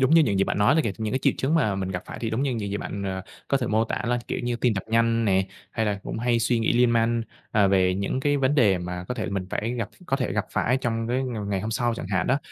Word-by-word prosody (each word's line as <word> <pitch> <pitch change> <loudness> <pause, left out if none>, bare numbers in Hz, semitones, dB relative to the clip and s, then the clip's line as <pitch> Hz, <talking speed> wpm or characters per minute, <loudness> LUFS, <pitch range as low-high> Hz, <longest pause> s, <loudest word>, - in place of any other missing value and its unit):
giống 130 - +3
như 165 0 +7
những 100 -9 +1
gì 95 - +4
bạn - - -2
nói 105 +8 +4
đó 160 - +4
kìa, 105 - 0
những 110 0 -2
cái 130 - +1
triệu - - +4
chứng 140 +4 +1
mà 115 -12 +2
mình 95 -1 -2
gặp 90 -1 -3
phải - - -7
thì 115 - -2
đúng 115 +4 0
như 140 - +1
những 105 -3 -3
gì 100 - -1
bạn, 100 -1 -5
ờ, 95 -1 -3 0.3
có 140 - +3
thể 125 - -1
mô 110 +1 +2
tả - - -3
là 120 0 +1
kiểu - - -2
như 120 -1 -1
tim 120 -2 +1
tập 95 - -3
nhanh 115 0 +2
nè, 95 -2 +2 0.2
hay 110 0 -1
là 100 -1 0
cũng - - -5
hay 120 0 +2
suy 115 +1 +2
nghĩ 110 - +1
liên 120 0 +4
man, 115 0 +2 0.3
à, 105 -2 +4
về 95 -1 +3
những 100 +7 -1
cái 145 +1 +2
vấn 135 0 +2
đề 105 -10 +4
mà 90 0 -5
có - - -2
thể 115 - -3
là - - -4
mình 95 -2 -2
phải 115 +3 -1
gặp 115 -3 -3 0.2
có 135 - +1
thể 130 - -2
gặp 105 - 0
phải 125 - +2
trong 115 -3 -2
cái 125 +2 0
ng 115 -6 -4
ngày 95 -1 0
hôm 110 - -3
sau 120 +1 0
chẳng 115 - -6
hạn 95 -2 0
đó. 135 - +2
115 Hz, 325 wpm, -25 LUFS, 100-125 Hz, 0.3 s, như